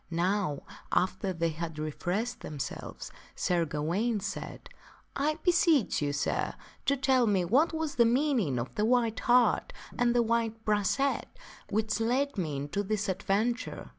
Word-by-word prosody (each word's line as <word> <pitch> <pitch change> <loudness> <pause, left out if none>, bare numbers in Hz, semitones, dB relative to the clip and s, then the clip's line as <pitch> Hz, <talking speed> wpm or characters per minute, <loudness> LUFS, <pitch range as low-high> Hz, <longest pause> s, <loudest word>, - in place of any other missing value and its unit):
Now, 175 -3 0 0.3
after 190 +1 +1
they 165 -2 0
had 165 0 -5
refreshed 175 +9 -2
themselves, 145 -3 -6 0.2
Sir 175 -2 +1
Gawaine 170 +10 -1
said, 200 0 -6 0.3
" - - -31
I 305 +2 0
beseech 335 - +3
you, 145 -1 0
sir, 145 0 -1 0.3
to 280 - +3
tell 260 -2 +3
me 190 -4 +2
what 265 - +3
was 320 -2 -2
the - - +7
meaning 235 - +2
of 120 +1 -4
the 210 - -1
white 235 -2 +2
hart 245 0 +3 0.3
and 245 0 +3
the 240 - +4
white 225 -1 -1
brachet 215 +7 +1 0.4
which 215 +1 0
led 260 +5 +1
me 160 -8 -2
into 145 +8 -2
this 205 0 -1
adventure." 200 +6 -1
215 Hz, 150 wpm, -29 LUFS, 175-245 Hz, 0.4 s, the